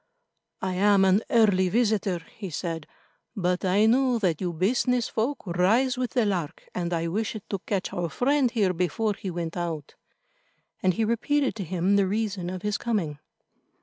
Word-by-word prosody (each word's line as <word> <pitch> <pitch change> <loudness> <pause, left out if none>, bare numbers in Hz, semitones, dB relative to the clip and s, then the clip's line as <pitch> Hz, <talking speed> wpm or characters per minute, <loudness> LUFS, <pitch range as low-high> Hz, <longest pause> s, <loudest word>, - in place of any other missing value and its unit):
"I 190 -1 -1
am 195 +1 +4
an 190 +2 +4
early 200 -5 +4
visitor," 205 -5 +1
he 200 -4 -6
said, 165 -1 -4 0.5
"but 180 -3 0
I 195 +3 +3
knew 250 +2 +3
that 180 -7 0
you 180 -2 -1
business 240 +7 +1
folk 235 +5 -2
rise 205 +9 +2
with 250 -1 -3
the 245 -4 +2
lark, 180 -7 -3
and 175 -1 -2
I 165 -1 0
wished 215 +5 -2
to 195 - -3
catch 195 -3 -2
our 175 -1 -2
friend 265 - +2
here 210 -6 +1
before 205 +5 0
he 195 - -6
went 170 -2 -4
out," 165 -4 -4 0.9
and 185 -1 +2
he 225 - +1
repeated 270 +5 +1
to 200 - -3
him 185 +3 +1
the 195 -1 +3
reason 200 -3 -2
of 185 +1 -6
his 210 0 -1
coming. 175 -11 -2
195 Hz, 175 wpm, -26 LUFS, 180-225 Hz, 0.9 s, am